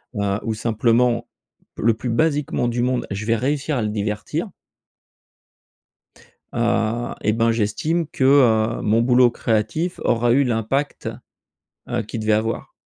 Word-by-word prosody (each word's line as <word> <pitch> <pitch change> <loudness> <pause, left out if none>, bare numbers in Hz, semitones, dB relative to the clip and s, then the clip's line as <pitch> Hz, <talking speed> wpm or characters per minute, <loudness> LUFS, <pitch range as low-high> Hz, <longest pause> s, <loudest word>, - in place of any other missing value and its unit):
heu, 100 -1 -1
ou 115 - -1
simplement, 115 +2 +1 0.5
le 115 +1 +3
plus 115 +3 -5
basiquement 145 0 0
du 120 0 -1
monde, 125 0 0
je 100 +2 -4
vais 115 +1 +2
réussir 140 +3 -1
à 120 - 0
le 105 - -1
divertir 105 0 -3 2.0
heu 115 0 0
et 105 - +2
ben 115 +1 +2
j'estime 130 +10 -1
que, 135 - -3
heu, 115 -5 +4
mon 110 +2 +2
boulot 125 0 +5
créatif 120 - -1
aura 120 0 +2
eu 140 +3 +4
l'impact 125 +4 -1 0.8
heu, 120 -1 -1
qu'il 110 +2 -6
devait 110 0 +2
avoir. 110 +2 -2
115 Hz, 140 wpm, -21 LUFS, 110-125 Hz, 2.0 s, boulot